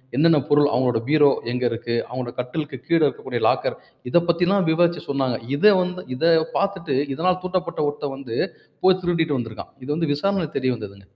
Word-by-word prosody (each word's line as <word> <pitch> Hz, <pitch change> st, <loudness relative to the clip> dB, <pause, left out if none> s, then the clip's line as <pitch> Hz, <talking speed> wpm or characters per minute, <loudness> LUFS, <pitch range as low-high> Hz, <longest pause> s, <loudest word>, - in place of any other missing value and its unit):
என்னென்ன 155 Hz, +1 st, +4 dB
பொருள். 145 Hz, 0 st, +4 dB
அவங்களுடைய 125 Hz, -3 st, +1 dB
பீரோ 150 Hz, -2 st, +5 dB, 0.2 s
எங்க 125 Hz, 0 st, -2 dB
இருக்கு? 115 Hz, +1 st, -3 dB
அவங்களோட 125 Hz, 0 st, -5 dB
கட்டிலுக்கு 145 Hz, +5 st, -4 dB
கீழே 165 Hz, -2 st, +3 dB
இருக்கக்கூடிய 130 Hz, -4 st, -3 dB
லாக்கர், -, -, 0 dB, 0.3 s
இத 175 Hz, -, +5 dB
பத்தில்லாம் 180 Hz, +2 st, +2 dB
விவரிச்சு 170 Hz, +1 st, +2 dB
சொன்னாங்க. 135 Hz, -4 st, 0 dB, 0.2 s
இத 185 Hz, -, 0 dB, 0.2 s
வந்து 180 Hz, 0 st, -4 dB
இத 165 Hz, -, -1 dB, 0.3 s
பார்த்துட்டு, 190 Hz, -8 st, -1 dB, 0.2 s
இதனால 180 Hz, +4 st, +2 dB
தூண்டப்பட்ட 185 Hz, -2 st, -3 dB
ஒருத்தன் 145 Hz, -1 st, -5 dB
வந்து, 125 Hz, -4 st, -6 dB, 0.5 s
போய் 185 Hz, 0 st, +5 dB
திருடிட்டு 165 Hz, -5 st, +1 dB
வந்திருக்கான். 115 Hz, -2 st, -7 dB
இது 130 Hz, -, -9 dB
வந்து 165 Hz, -3 st, 0 dB
விசாரணையில 180 Hz, 0 st, -1 dB
தெரிய 130 Hz, -1 st, +1 dB
வந்ததுங்க. 100 Hz, -2 st, -10 dB
145 Hz, 165 wpm, -22 LUFS, 125-175 Hz, 0.5 s, பீரோ